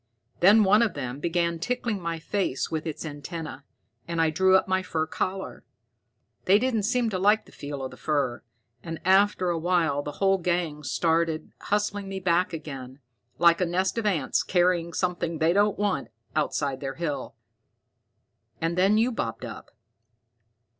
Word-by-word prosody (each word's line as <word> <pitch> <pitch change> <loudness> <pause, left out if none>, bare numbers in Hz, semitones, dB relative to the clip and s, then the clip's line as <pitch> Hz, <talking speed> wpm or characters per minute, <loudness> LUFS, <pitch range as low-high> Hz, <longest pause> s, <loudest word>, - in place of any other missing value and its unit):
Then 205 +5 +7
one 205 +3 +5
of 230 -3 +1
them 130 -1 -4
began 170 +1 0
tickling 235 -1 -2
my 170 -1 -3
face 165 -4 -2
with 160 0 -3
its 160 +1 -5
antenna, 155 0 -7 0.4
and 170 -1 -2
I 160 -1 +3
drew 190 +4 +4
up 190 - -1
my 185 0 +1
fur 160 -4 -2
collar. 190 +4 -4 0.8
They 195 +2 +6
didn't 225 -3 0
seem 245 -3 +1
to 185 - -2
like 210 +3 +3
the - - -18
feel 145 -1 -6
of 130 - -5
the - - -12
fur, 140 -6 -1 0.4
and 165 +2 -6
after 190 -1 +4
a 170 - -1
while 165 -4 +1
the 145 0 -6
whole 195 +2 +2
gang 170 -4 -1
started 160 +3 0
hustling 205 -1 -1
me 195 0 -4
back 180 0 +1
again, 135 -5 -7 0.4
like 170 +1 +5
a - - +3
nest 185 +2 0
of 215 - -1
ants 160 -10 +1
carrying 175 -2 +1
something 175 -2 -1
they 160 +2 +3
don't 205 +1 +2
want 205 -2 0 0.3
outside 145 -3 0
their 135 -1 -5
hill. 165 -4 -4 1.2
And 165 +1 -1
then 195 +4 +4
you 235 +3 +3
bobbed 115 - -4
up." - - -9
170 Hz, 165 wpm, -26 LUFS, 155-195 Hz, 1.2 s, Then